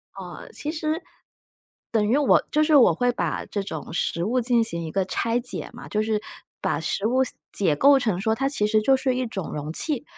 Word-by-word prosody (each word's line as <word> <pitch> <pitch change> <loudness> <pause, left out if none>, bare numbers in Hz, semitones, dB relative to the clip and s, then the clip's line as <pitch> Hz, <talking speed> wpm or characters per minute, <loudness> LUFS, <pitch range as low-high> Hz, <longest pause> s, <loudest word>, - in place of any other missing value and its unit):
哦， 180 -3 -9
其 300 - -4
实， 315 +1 -2 0.9
等 215 -2 +2
于 255 - +3
我 290 -2 +4
就 305 - +3
是 310 0 +3
我 270 - +7
会 245 0 +1
把 - - -3
这 200 - -3
种 165 -7 -7
食 170 0 -1
物 245 +5 +1
进 235 -1 +3
行 170 -6 -2
一 160 - -5
个 195 +1 0
拆 230 +5 -1
解 245 0 -2
嘛， 240 - -10
就 215 - -1
是 215 -1 0 0.4
把 - - -1
食 200 - -2
物 255 +4 +2 0.3
解 175 -7 +1
构 275 - +5
成 215 -8 -1
说 220 +3 +1
它 270 +4 0
其 210 -7 0
实 215 0 +2
就 265 +4 +4
是 260 -1 0
一 255 -1 -1
种 195 -6 -5
容 150 +1 -4
器， 290 - +1
230 Hz, 235 characters per minute, -24 LUFS, 195-265 Hz, 0.9 s, 我